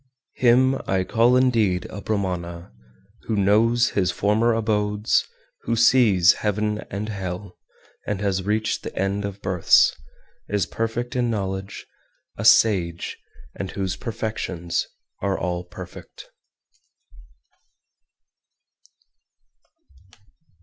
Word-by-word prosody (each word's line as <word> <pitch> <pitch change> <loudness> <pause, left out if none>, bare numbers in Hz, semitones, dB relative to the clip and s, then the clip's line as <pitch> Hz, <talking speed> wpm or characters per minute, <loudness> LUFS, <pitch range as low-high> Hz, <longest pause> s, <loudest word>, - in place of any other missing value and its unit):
423. 125 - +3
Him 130 +2 +4 0.2
I - - 0
call 115 +5 +3
indeed 115 -8 +2
a 100 - -7
Brahmana 90 -4 -3 0.5
who 110 - 0
knows 110 +4 +3
his 90 -3 +1
former 105 +6 +2
abodes, 105 -1 0 0.4
who - - 0
sees 110 -7 +5
heaven 105 0 -1
and 100 +2 -4
hell, 95 -2 -6 0.5
has 100 -2 -1
reached 105 +3 -1
the - - -8
end 100 +1 -1
of 100 0 -7
births, 95 -3 +4 0.5
is 100 -2 0
perfect 115 +3 -3
in 120 -1 +1
knowledge, 95 -2 -4 0.5
a - - -5
sage, 90 -6 +3 0.3
and 95 - -5
whose 95 -1 -3
perfections 105 -6 -3 0.3
are 100 0 0
all 90 -1 -3
perfect. - - -11
105 Hz, 100 wpm, -23 LUFS, 95-115 Hz, 0.5 s, sees